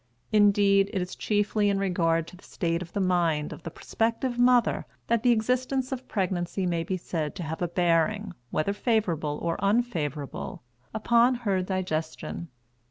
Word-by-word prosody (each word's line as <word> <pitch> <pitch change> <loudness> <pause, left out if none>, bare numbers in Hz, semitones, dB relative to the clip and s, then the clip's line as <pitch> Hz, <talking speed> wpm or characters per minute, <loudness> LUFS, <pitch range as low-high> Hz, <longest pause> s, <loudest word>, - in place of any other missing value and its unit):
Indeed, 200 -2 +4
it 195 - 0
is 180 0 -4
chiefly 205 0 +1
in 200 - +1
regard 165 -4 +1
to 180 - -12
the 180 - -18
state 170 -1 -2
of 170 -1 -8
the 205 - -1
mind 170 -5 +1
of - - -11
the 170 - -6
prospective 230 +7 -2
mother 245 -1 +3 0.2
that 230 -1 +1
the 245 - +3
existence 255 +3 0
of 260 -1 -5
pregnancy 185 -2 -1
may 170 -2 0
be 185 +2 -2
said 160 -4 -3
to 180 - -5
have 160 +1 -5
a 175 - +1
bearing, 175 +4 +1 0.2
whether 155 +10 0
favorable 180 - 0
or 170 +3 -2
unfavorable, 170 - -1 0.3
upon 235 +3 +3
her 195 -2 +2
digestion. 170 -3 -3
190 Hz, 165 wpm, -27 LUFS, 170-220 Hz, 0.3 s, Indeed